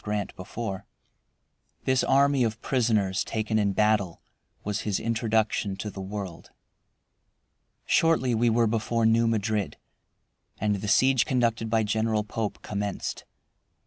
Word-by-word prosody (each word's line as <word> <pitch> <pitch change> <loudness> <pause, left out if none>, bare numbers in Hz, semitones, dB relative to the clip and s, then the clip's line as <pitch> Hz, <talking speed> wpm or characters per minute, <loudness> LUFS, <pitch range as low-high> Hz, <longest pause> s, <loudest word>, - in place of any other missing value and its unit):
Grant 105 -1 -3
before. 95 +1 -6 1.0
This 130 -1 +2
army 140 -1 +3
of 110 -1 -1
prisoners 110 -7 +1
taken 110 0 -1
in 100 -1 +1
battle 105 -4 +1 0.4
was 105 0 -2
his 105 -3 -1
introduction 110 -3 0
to 105 +2 -5
the 95 - -7
world. 95 -3 -6 1.4
Shortly 160 -7 +3
we 115 +1 +3
were 115 +1 +3
before 115 +1 0
New 115 +1 +4
Madrid, 110 -2 -1 0.8
and 105 -1 +1
the 100 +2 -5
siege 130 +3 +4
conducted 115 -3 0
by 110 0 +2
General 110 0 0
Pope 105 0 -4
commenced. 100 -1 -4
110 Hz, 125 wpm, -26 LUFS, 105-115 Hz, 1.4 s, New